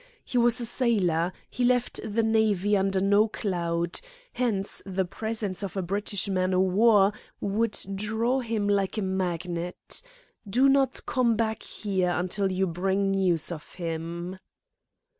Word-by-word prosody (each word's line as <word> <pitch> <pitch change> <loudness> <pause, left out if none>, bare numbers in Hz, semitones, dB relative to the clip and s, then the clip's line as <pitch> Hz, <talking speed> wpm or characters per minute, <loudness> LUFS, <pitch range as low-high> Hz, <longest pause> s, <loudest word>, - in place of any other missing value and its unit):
He 250 - 0
was 240 0 +3
a 240 - -2
sailor. 190 -9 +1 0.2
He 250 - -3
left 245 0 +2
the 220 +1 0
Navy 215 -3 +2
under 195 -1 +1
no 205 +3 +4
cloud. 170 -5 -1 0.3
Hence, 210 -6 -1
the 190 -1 -1
presence 215 0 -4
of 200 -1 -5
a 190 - 0
British 200 +2 -1
man 185 -1 +1
o' - - +3
war 200 +2 +4 0.3
would 210 +2 0 0.2
draw 220 +6 0
him 225 -4 -1
like 200 0 +1
a 215 - 0
magnet. 180 -2 -2 0.5
Do 255 +7 +4
not 275 -1 +2
come 240 -3 +2
back 220 0 -1
here 190 -4 -1
until 190 +2 0
you 190 +1 +1
bring 190 +3 0
news 180 -4 +1
of 155 -3 -8
him." 170 +2 -5
195 Hz, 145 wpm, -27 LUFS, 185-220 Hz, 0.5 s, no